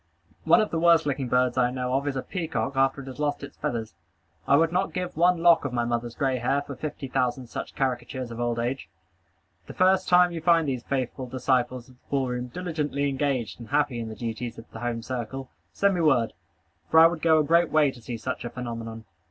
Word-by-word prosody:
One 230 - +6
of 215 - -2
the 165 - 0
worst 165 -1 +5
looking 140 -2 -1
birds 125 0 +2
I 120 -1 +3
know 125 0 -3
of 140 +2 0
is 140 - -1
a 130 - -2
peacock 160 -6 -3
after 135 +1 +2
it - - -11
has 130 0 -9
lost 145 -1 -1
its 140 - -9
feathers. 110 -5 -3 0.5
I 140 - +5
would 165 +1 +3
not 185 +2 0
give 180 -1 -3
one 170 +1 +3
lock 170 -2 +6
of 140 -3 -3
my 120 -1 0
mother's 120 0 -2
gray 135 -2 0
hair 135 +4 0
for 140 - -8
fifty 145 -1 -5
thousand 125 -1 -1
such - - -6
caricatures 125 -1 -2
of 115 - -7
old 120 -1 -1
age. 120 -4 -3 0.8
The - - -9
first 185 +1 +3
time 180 0 +6
you 165 -1 -5
find 165 -1 +3
these 130 -3 -2
faithful 130 0 -3
disciples 125 -1 0
of 130 -1 -19
the - - -38
ball 135 -2 0
room 125 0 -3
diligently 150 -2 -2
engaged 135 -5 -2
and 115 - -10
happy 145 -4 +1
in 115 -1 -4
the 110 - -7
duties 115 +1 -5
of 115 - -10
the 115 - -8
home 120 -1 -3
circle, 130 +2 -5 0.2
send 200 0 +2
me 175 - 0
word, 135 -8 +3 0.6
for 160 - +6
I 165 - +9
would 165 -1 +2
go 160 -1 +5
a 155 - +4
great 170 +2 +3
way 150 -3 +3
to 125 - -14
see 115 +1 -5
such 130 +3 -4
a 120 - -4
phenomenon. 115 -2 -6
135 Hz, 235 wpm, -26 LUFS, 120-155 Hz, 0.8 s, I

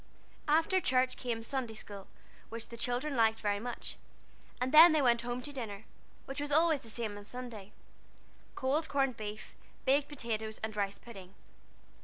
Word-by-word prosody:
After 325 +5 +3
church 255 -3 +2
came 235 -3 -3
Sunday 245 -2 -3
school, 200 -2 -9 0.4
which 230 0 -7
the 235 - -8
children 245 +5 -1
liked 225 -2 +3
very 205 -1 0
much, 240 +3 -5 0.6
and 250 +1 0
then 320 +2 +10
they 310 - +4
went 235 -2 +4
home 245 +1 -3
to 290 - -7
dinner, 220 -6 -5 0.4
which 270 +2 -5
was 290 0 -3
always 315 -1 +4
the 225 - -11
same 220 -2 -4
on 205 - -12
Sunday 225 -4 -8 0.8
cold 295 +5 0
corned 270 -3 +1
beef, 215 -1 -7 0.3
baked 275 +2 +3
potatoes, 220 -6 -4
and 220 -1 -3
rice 200 -1 -1
pudding. 195 -5 -12
240 Hz, 165 wpm, -33 LUFS, 220-275 Hz, 0.8 s, then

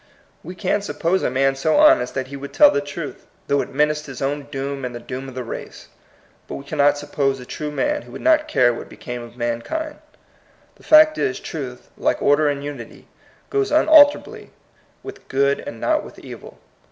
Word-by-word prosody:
We 180 +4 -8
can 195 +2 0
suppose 185 -2 -1
a - - 0
man 135 +1 +1
so 155 +4 +1
honest 295 - +5
that 130 -1 -3
he 140 - -7
would 140 0 -8
tell 295 -1 +7
the 140 - 0
truth, 145 +2 -8 0.2
though 140 0 +1
it - - -7
menaced 150 +2 0
his 135 -2 -8
own 140 +1 -2
doom 135 0 -4
and 125 -1 -4
the - - -6
doom 130 +2 -7
of 130 - -12
the 130 - -4
race. 115 - -8 0.6
But - - -6
we 140 - -8
cannot 145 0 +2
suppose 135 -2 -1
a 125 - -10
true 150 +4 -5
man 295 - -1
who - - -15
would - - -8
not 310 0 +3
care 125 - +3
what - - -8
be - - -14
came 125 -1 -6
of 120 +1 -12
mankind. 125 - -3 0.7
The - - -24
fact 310 0 +6
is, 130 - -1
truth, 130 -6 -7
like - - +1
order 145 +1 +3
and 140 -1 -3
unity, 145 -5 -9 0.4
goes 410 -1 +1
unalterably 305 -1 +4 0.5
with 400 - -10
good 140 +1 +1
and 115 - -8
not - - +1
with - - -12
evil. - - -11
140 Hz, 200 wpm, -21 LUFS, 130-185 Hz, 0.7 s, tell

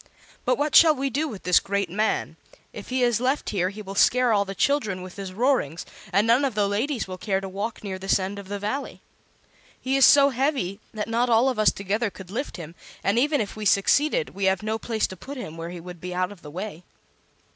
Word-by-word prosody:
But 250 -1 +2
what 295 +1 -1
shall 320 -2 +8
we 270 0 -2
do 295 +6 0
with 215 -9 -8
this 180 -1 +5
great 200 -1 -1
man? 210 +5 -1 0.4
If - - -9
he 255 0 0
is 240 -3 +2
left 265 +3 0
here 185 -3 0
he 210 +2 -9
will 195 0 -7
scare 250 +3 +4
all 200 -1 +2
the 195 0 -6
children 215 -11 0
with 185 -1 -10
his 195 -2 -6
roarings, 200 - 0 0.3
and 200 +2 +3
none 235 +5 +4
of 265 -6 -1
the 205 -1 +2
ladies 225 +4 -1
will 185 -1 -7
care 195 -1 0
to 195 - -6
walk 200 +4 -5
near 190 -2 -5
this 195 +1 +2
end 195 +1 -4
of 200 - -10
the 205 +1 -4
Valley. 215 +8 -4 0.8
He 265 +1 -1
is 275 - +4
so 280 0 +7
heavy 255 - -1
that 210 -1 -4
not 235 +2 +1
all 235 +3 +4
of 250 -4 -3
us 215 - +5
together 205 +3 -2
could 190 -2 -12
lift 260 +3 -4
him, 165 -1 -8 0.3
and 200 +4 +2
even 290 0 +2
if 205 - -5
we 215 - -6
succeeded 295 - +2
we 195 0 -3
have 190 +1 +1
no 220 +1 -2
place 225 -2 -1
to 190 - -6
put 275 +10 -9
him 160 -10 -7
where 165 0 -6
he 175 0 -7
would 175 -1 -10
be 180 0 -5
out 185 +2 0
of 200 -4 -13
the 150 - -10
way." 180 +2 -6
210 Hz, 245 wpm, -25 LUFS, 190-255 Hz, 0.8 s, shall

